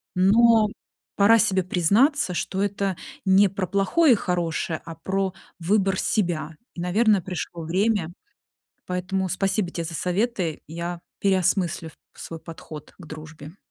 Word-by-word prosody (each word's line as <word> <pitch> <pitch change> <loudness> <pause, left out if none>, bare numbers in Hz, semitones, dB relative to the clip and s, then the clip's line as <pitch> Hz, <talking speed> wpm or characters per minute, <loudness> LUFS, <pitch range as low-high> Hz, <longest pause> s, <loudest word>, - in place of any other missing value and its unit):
Но 220 +4 +5 0.5
пора 225 +3 +6
себе 190 -4 +2
признаться, 195 - +2
что 190 +3 -2
это 200 -2 -1 0.3
не 195 +1 +6
про 195 0 -3
плохое 200 - +3
и - - +4
хорошее, 170 -4 -2
а 165 - -7
про 190 +3 -2 0.3
выбор 195 +2 +1
себя. 165 -6 -1 0.2
И, 170 - -5
наверное, 205 +2 +3
пришло 175 -1 -5
время. 185 +1 0 0.7
Поэтому 185 +1 -2
спасибо 190 +1 0
те 170 -1 -4
за 165 - -6
советы. 180 -2 -1
Я 170 +2 -5 0.2
переосмыслю 185 -4 +1 0.3
свой 165 -1 -8
подход 160 -2 -10
к 170 - -12
дружбе. 155 +2 -10
185 Hz, 130 wpm, -24 LUFS, 170-200 Hz, 0.7 s, пора